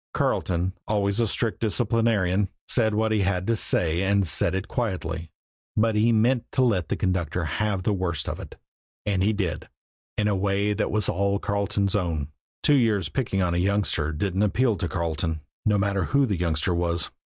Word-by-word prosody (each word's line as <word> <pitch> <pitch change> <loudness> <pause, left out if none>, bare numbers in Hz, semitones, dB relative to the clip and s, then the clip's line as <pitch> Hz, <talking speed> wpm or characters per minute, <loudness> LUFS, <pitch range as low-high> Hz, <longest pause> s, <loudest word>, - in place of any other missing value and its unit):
Carleton, 90 +1 0
always 100 0 +1
a 115 - +2
strict 110 +2 -1
disciplinarian, 110 -4 +1 0.2
said 110 -4 +2
what 110 +1 +1
he 110 -2 +2
had 95 -1 0
to 115 - +2
say 85 -5 +1
and 100 0 +2
said 80 +3 +2
it 95 +2 -3
quietly; 85 -8 -3 0.5
but 110 +1 +3
he 110 +2 +3
meant 115 +2 +3
to 130 - +3
let 95 - +1
the - - +1
conductor 90 -2 -1
have 105 +3 -1
the 105 - +1
worst 90 -5 -2
of - - -4
it, - - -9 0.5
and 100 -3 +1
he 100 +3 +3
did 90 -7 -3 0.5
in 105 - +2
a 105 - +2
way 100 +2 +1
that - - -1
was 105 -1 +1
all 100 +2 +1
Carleton's 100 -1 -1
own. 85 -7 -1 0.3
Two 150 - +5
years' 105 -9 +2
picking 95 -3 -1
on 85 -1 0
a - - 0
youngster 95 -5 +1
didn't 95 +5 -1
appeal 115 +3 +2
to 90 - -2
Carleton, 80 -2 -2 0.3
no 105 -1 +4
matter 100 -1 0
who 140 0 +3
the 105 -6 -1
youngster 85 +1 +1
was. 85 -2 0
100 Hz, 185 wpm, -25 LUFS, 90-110 Hz, 0.5 s, Two